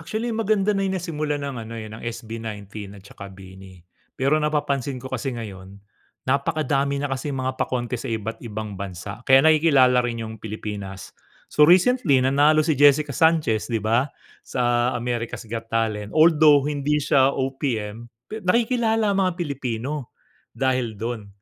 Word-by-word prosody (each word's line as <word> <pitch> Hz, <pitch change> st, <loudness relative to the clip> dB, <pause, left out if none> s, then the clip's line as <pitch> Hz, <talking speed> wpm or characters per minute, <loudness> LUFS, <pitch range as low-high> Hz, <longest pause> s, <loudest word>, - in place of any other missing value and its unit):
Actually 220 Hz, +8 st, -3 dB
maganda 210 Hz, -2 st, +1 dB
na 195 Hz, -, -1 dB
yung 190 Hz, -1 st, 0 dB
nasimulan 150 Hz, -4 st, -3 dB
ng 140 Hz, -2 st, -4 dB
ano, 115 Hz, +1 st, -8 dB
eh, 110 Hz, -1 st, -7 dB
ng 110 Hz, -, -9 dB
SB19 110 Hz, -3 st, -7 dB
at 95 Hz, -, -14 dB
saka 100 Hz, 0 st, -11 dB
BINI, 95 Hz, -2 st, -14 dB, 0.3 s
pero 140 Hz, +4 st, +2 dB
napapansin 140 Hz, -3 st, -1 dB
ko 130 Hz, +1 st, -9 dB
kasi 130 Hz, +1 st, -2 dB
ngayon, 95 Hz, -3 st, -8 dB, 0.5 s
napakadami 140 Hz, 0 st, 0 dB
na 145 Hz, -1 st, -3 dB
kasing 135 Hz, +1 st, -3 dB
mga 130 Hz, 0 st, -1 dB
pa-contest 125 Hz, 0 st, -2 dB
sa -, -, -3 dB
iba't 110 Hz, +1 st, -4 dB
ibang 110 Hz, -4 st, -6 dB
bansa, 95 Hz, +2 st, -7 dB
kaya 135 Hz, +1 st, +7 dB
nakikilala 145 Hz, -6 st, +5 dB
rin 115 Hz, -2 st, -3 dB
yung 110 Hz, -1 st, -9 dB
Pilipinas. 105 Hz, -3 st, -7 dB, 0.4 s
So 150 Hz, 0 st, +5 dB
recently 185 Hz, -, +4 dB
nanalo 145 Hz, +3 st, +4 dB
si 155 Hz, -, +2 dB
Jessica 145 Hz, 0 st, +5 dB
Sanchez, 155 Hz, -7 st, +2 dB
'di 115 Hz, -4 st, -2 dB
ba, 120 Hz, +6 st, +2 dB, 0.3 s
sa 120 Hz, 0 st, 0 dB
America's 120 Hz, -1 st, -3 dB
Got 115 Hz, 0 st, -6 dB
Talent, 110 Hz, 0 st, -2 dB
although 155 Hz, -3 st, +6 dB
hindi 150 Hz, 0 st, 0 dB
siya 140 Hz, -2 st, +3 dB
OPM, 120 Hz, -4 st, -3 dB, 0.2 s
pe 220 Hz, +10 st, -7 dB
nakikilala 225 Hz, +1 st, +1 dB
ang 195 Hz, -, +1 dB
mga 185 Hz, -1 st, +2 dB
Pilipino 135 Hz, -, -4 dB, 0.4 s
dahil 130 Hz, -5 st, 0 dB
dun. 115 Hz, -1 st, -5 dB
130 Hz, 155 wpm, -23 LUFS, 110-150 Hz, 0.5 s, kaya